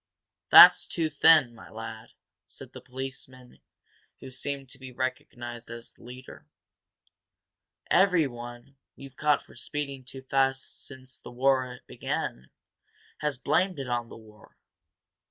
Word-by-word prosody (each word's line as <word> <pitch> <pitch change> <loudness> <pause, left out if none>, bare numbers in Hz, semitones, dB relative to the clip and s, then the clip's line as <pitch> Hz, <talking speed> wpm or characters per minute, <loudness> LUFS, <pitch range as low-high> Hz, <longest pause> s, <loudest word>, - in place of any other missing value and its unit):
"That's - - +10
too 160 -2 -1
thin, 155 -4 +5
my 115 - -14
lad," 110 0 -9 0.3
said - - -11
the - - -10
policeman 130 -1 -9 0.6
who 130 - -10
seemed 135 +1 -4
to 130 - -13
be 130 -1 -9
recognized 120 -2 -5
as 115 0 -9
the - - -24
leader. 125 +1 -12 1.4
"Everyone, 135 -8 +1 0.2
we've 135 -1 -12
caught 150 +1 +1
for - - -18
speeding 140 +2 -5
too 130 0 -10
fast 135 0 -1
since 130 -2 -10
the - - -11
war 130 0 0
began 65 +1 -4 0.7
has 150 -3 -2
blamed 180 +6 +1
it 135 -2 -5
on 120 -1 -2
the - - -11
war. 110 -1 -18
130 Hz, 130 wpm, -27 LUFS, 120-140 Hz, 1.4 s, That's